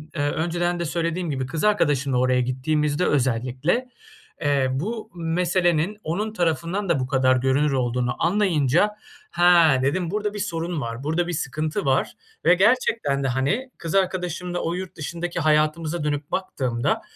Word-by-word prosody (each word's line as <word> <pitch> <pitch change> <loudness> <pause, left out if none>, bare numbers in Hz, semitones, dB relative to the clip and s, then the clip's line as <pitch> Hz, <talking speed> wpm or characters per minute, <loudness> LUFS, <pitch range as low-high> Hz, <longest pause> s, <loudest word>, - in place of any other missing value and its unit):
eee, 150 - -1
önceden 175 +2 -1
de 170 - -1
söylediğim 170 +2 -2
gibi 130 -2 -2
kız 150 +5 -4
arkadaşımla 145 -11 +2
oraya 130 0 +2
gittiğimizde 145 +6 0
özellikle, 130 - 0 0.5
eee, 140 -3 +2
bu 215 - -4
meselenin 175 +2 +1
onun 205 +7 -2
tarafından 175 +2 -1
da 165 -5 +2
bu 130 - -2
kadar 130 -1 +3
görünür 135 +3 +2
olduğunu 125 -1 0
anlayınca, 175 0 +2 0.4
"Ha," 170 -5 +5
dedim, 165 +5 0
"burada 210 0 -2
bir 210 - -5
sorun 165 -3 -3
var, 115 +1 -5
burada 160 +4 0
bir 175 - -3
sıkıntı 155 +4 -2
var." 135 0 +1 0.3
Ve - - +7
gerçekten 205 - +2
de, - - +1
hani, 140 - -1
kız 165 +2 -4
arkadaşımla 180 -2 -1
o 165 - -2
yurt 185 0 -6
dışındaki 170 +2 -4
hayatımıza 155 +1 +1
dönüp 145 -1 -2
baktığımda, 130 -10 -1
165 Hz, 150 wpm, -23 LUFS, 135-180 Hz, 0.5 s, Ve